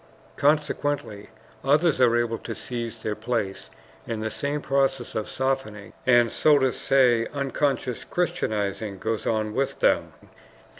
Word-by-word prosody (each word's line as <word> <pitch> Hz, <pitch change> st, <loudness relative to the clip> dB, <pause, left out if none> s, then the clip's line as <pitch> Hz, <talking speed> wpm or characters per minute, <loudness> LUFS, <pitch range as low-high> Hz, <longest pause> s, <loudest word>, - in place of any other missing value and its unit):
Consequently 145 Hz, -6 st, 0 dB, 0.3 s
others 145 Hz, +1 st, +3 dB
are 120 Hz, -2 st, +5 dB
able 115 Hz, -1 st, -1 dB
to 115 Hz, -, -6 dB
seize 120 Hz, -2 st, -5 dB
their 110 Hz, -, -1 dB
place, 105 Hz, -3 st, -3 dB, 0.4 s
and 110 Hz, -1 st, -3 dB
the 110 Hz, -, -2 dB
same 145 Hz, +1 st, -2 dB
process 135 Hz, -3 st, 0 dB
of 110 Hz, -, -3 dB
softening 130 Hz, -6 st, -2 dB
and, 120 Hz, -2 st, +5 dB
so 150 Hz, -1 st, +4 dB
to 130 Hz, -2 st, +2 dB
say, 125 Hz, -4 st, +3 dB
unconscious 140 Hz, -2 st, -1 dB
Christianizing 105 Hz, -, -2 dB
goes 110 Hz, +3 st, -3 dB
on 110 Hz, -1 st, 0 dB
with 135 Hz, +3 st, -1 dB
them. -, -, +2 dB
120 Hz, 135 wpm, -25 LUFS, 110-140 Hz, 0.4 s, are